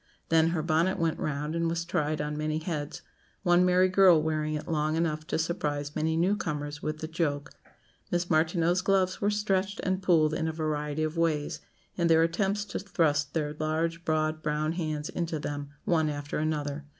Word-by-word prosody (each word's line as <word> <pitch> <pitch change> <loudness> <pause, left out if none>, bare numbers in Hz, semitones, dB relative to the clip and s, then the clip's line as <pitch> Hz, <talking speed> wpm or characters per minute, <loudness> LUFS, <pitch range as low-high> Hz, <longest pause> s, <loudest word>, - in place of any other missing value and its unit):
Then 160 0 +4
her 165 -2 -1
bonnet 165 +3 +2
went 165 -1 0
round, 150 +1 -2
and 165 0 0
was 170 0 -2
tried 155 -4 -1
on 150 0 -3
many 155 +1 -1
heads; 155 -3 -4 0.4
one 175 -1 +5
merry 180 +1 +4
girl 185 -3 +6
wearing 155 0 -1
it 150 - -5
long 155 -1 0
enough 155 -1 -1
to - - -1
surprise 150 -3 -2
many 160 +1 0
new 185 +5 +3
comers 145 -5 -4
with 155 0 -4
the 155 - -3
joke. 150 -3 -2 0.6
Miss 175 0 0
Martineau's 170 +2 +2
gloves 190 -1 +1
were 205 - +2
stretched 200 -2 0
and 185 0 0
pulled 160 -5 +3
in 160 - -1
a - - 0
variety 155 -1 -2
of 155 +1 -2
ways, 155 -3 0 0.4
in 170 -2 +2
their 165 0 +5
attempts 195 +5 0
to - - -4
thrust 160 -7 0
their 150 -2 -1
large, 160 +2 -1
broad 155 0 0
brown 150 0 0
hands 155 -3 -3
into 170 -2 -3
them, 145 -1 -4 0.2
one 160 -6 +2
after 145 0 -4
another. 150 -1 -2
160 Hz, 185 wpm, -28 LUFS, 150-175 Hz, 0.6 s, girl